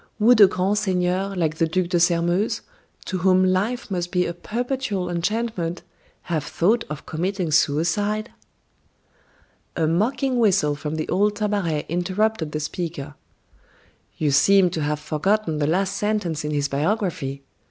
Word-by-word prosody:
Would 225 +1 +5
a 200 - +10
grand 190 +3 0
seigneur, 185 0 0
like 160 -3 -1
the 165 - +2
Duc 175 +2 -1
de 175 -2 +2
Sairmeuse, 175 +3 +1 0.4
to 185 - -3
whom 185 +1 +4
life 205 +6 0
must 175 -2 -2
be 180 -1 +1
a 170 - -3
perpetual 220 -2 -3
enchantment, 180 -1 -2 0.4
have 160 -5 -2
thought 220 +10 +1
of 150 -1 -7
committing 180 +1 -2
suicide?" 205 +10 +1 1.4
A 165 - +1
mocking 240 - +1
whistle 185 -9 +3
from 150 +1 -4
the 155 - -3
old 205 +3 +1
Tabaret 200 -8 -1
interrupted 185 0 -1
the 150 - -2
speaker. 150 -2 -5 1.0
"You 150 -2 +1
seem 185 +5 +5
to 165 - -3
have 150 0 -1
forgotten 160 +2 0
the 145 - +1
last 185 +4 0
sentence 205 -7 -1
in 150 - -3
his 145 -1 0
biography: 165 - -1
'M. 140 0 -15
180 Hz, 150 wpm, -23 LUFS, 160-205 Hz, 1.4 s, a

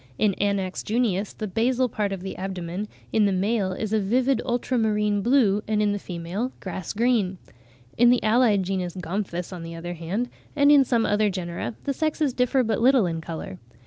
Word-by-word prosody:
In 210 -2 +2
Anax 195 -2 0
junius 215 -3 0
the 215 - -5
basal 240 +5 +1
part 210 -3 -2
of 190 -2 -5
the 190 - -5
abdomen 185 +1 -4 0.3
in 215 -2 +4
the 200 - +2
male 195 +1 0
is 215 +3 -3
a 220 - +3
vivid 250 +5 +1
ultramarine 220 -4 0
blue, 220 -4 +3
and 215 -1 +1
in 210 -1 +2
the 205 - -2
female 180 +8 -4
grass 185 -2 -5
green. 215 -5 +1 0.6
In 240 0 +7
the 245 -3 +3
allied 215 -2 +3
genus 185 -1 -3
Gomphus, 180 0 -4
on 180 - -7
the 165 0 -7
other 175 +1 -5
hand, 180 +9 -3 0.3
and 285 0 +5
in 285 -2 +7
some 235 -3 +1
other 210 0 +2
genera, 170 - -4
the 280 - -1
sexes 305 -1 0
differ 250 +1 +2
but 220 -2 -1
little 255 -3 +5
in 165 -2 -2
colour. 160 - -7
205 Hz, 190 wpm, -25 LUFS, 185-240 Hz, 0.6 s, In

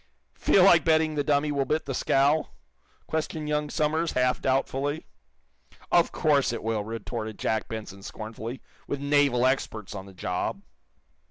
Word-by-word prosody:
"Feel 190 - +4
like 175 -4 +7
betting 160 -1 +3
the 145 -1 0
dummy 145 +1 +1
will 140 -1 +1
bit 155 +4 -1
the 135 - -3
scow?" 140 +4 +2 0.6
questioned 155 -1 -3
young 150 0 -1
Somers, 155 +3 0
half 125 0 +1
doubtfully. 135 +3 -1 0.9
"Of 170 -1 +4
course 145 -6 +2
it 120 - -5
will," 110 -2 -1
retorted 110 0 -5
Jack 110 -1 -1
Benson, 105 -3 -7
scornfully, 110 +4 -7 0.2
"with 145 - -3
naval 140 -3 +3
experts 110 -6 -1
on 95 -1 -7
the 95 - -14
job!" 90 - -3
140 Hz, 150 wpm, -27 LUFS, 115-150 Hz, 0.9 s, like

